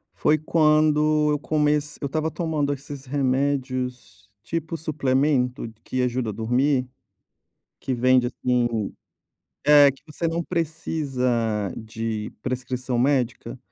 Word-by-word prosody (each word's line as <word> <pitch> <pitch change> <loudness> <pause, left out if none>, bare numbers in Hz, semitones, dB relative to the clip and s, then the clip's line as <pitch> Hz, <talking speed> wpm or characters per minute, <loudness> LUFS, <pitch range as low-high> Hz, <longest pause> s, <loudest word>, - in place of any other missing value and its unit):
Foi 155 - +3
quando 155 -1 +3
eu 150 - 0
comece 150 -1 0
eu - - -2
estava 155 +3 -1
tomando 155 -4 -1
esses 140 0 -7
remédios, 130 -5 -2
tipo 165 +5 -3
suplemento 135 -4 0 0.2
que 130 - -2
ajuda 125 -2 -1
a - - -2
dormir. 125 +5 +1 0.9
Que 135 - -3
vende, 125 0 +3
assim 120 -4 -1 0.7
é, 145 -1 +8
que 135 - -20
você 165 +2 -3
não 165 +1 -1
precisa 130 - -1
de 110 -1 -4
prescrição 125 0 -2
médica. 125 -2 0
135 Hz, 115 wpm, -24 LUFS, 125-150 Hz, 0.9 s, é